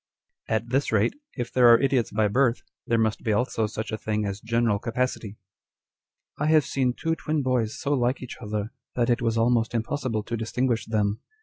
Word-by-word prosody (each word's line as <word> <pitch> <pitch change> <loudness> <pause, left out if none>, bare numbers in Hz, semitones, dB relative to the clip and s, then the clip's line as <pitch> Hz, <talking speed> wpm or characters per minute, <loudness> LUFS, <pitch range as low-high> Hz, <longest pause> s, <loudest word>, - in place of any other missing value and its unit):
2 - - -1
At 115 +2 -2
this 135 +3 +1
rate, 110 0 +2 0.2
if 120 -2 -4
there 125 -2 +6
are 115 - +7
idiots 135 -4 +1
by 105 0 +1
birth, 125 +2 +2 0.2
there 115 - +2
must 110 -1 +1
be 110 - -1
also 110 0 0
such 110 +1 -5
a 110 - -3
thing 105 -1 -1
as 100 0 -4
general 115 -2 +1
capacity. 115 -2 -2 0.5
" - - -39
I 150 - +1
have 155 -2 +4
seen 130 -2 0
two 165 +5 -1
twin 155 -2 -1
boys 125 -4 0
so 145 - 0
like 125 -1 0
each 125 - -8
other, 105 0 -3 0.2
that 120 0 +2
it 120 +1 +1
was 115 -1 0
almost 115 0 +2
impossible 115 -1 -1
to 120 - -4
distinguish 115 +1 -1
them. 105 -1 0
115 Hz, 205 wpm, -25 LUFS, 110-125 Hz, 0.5 s, are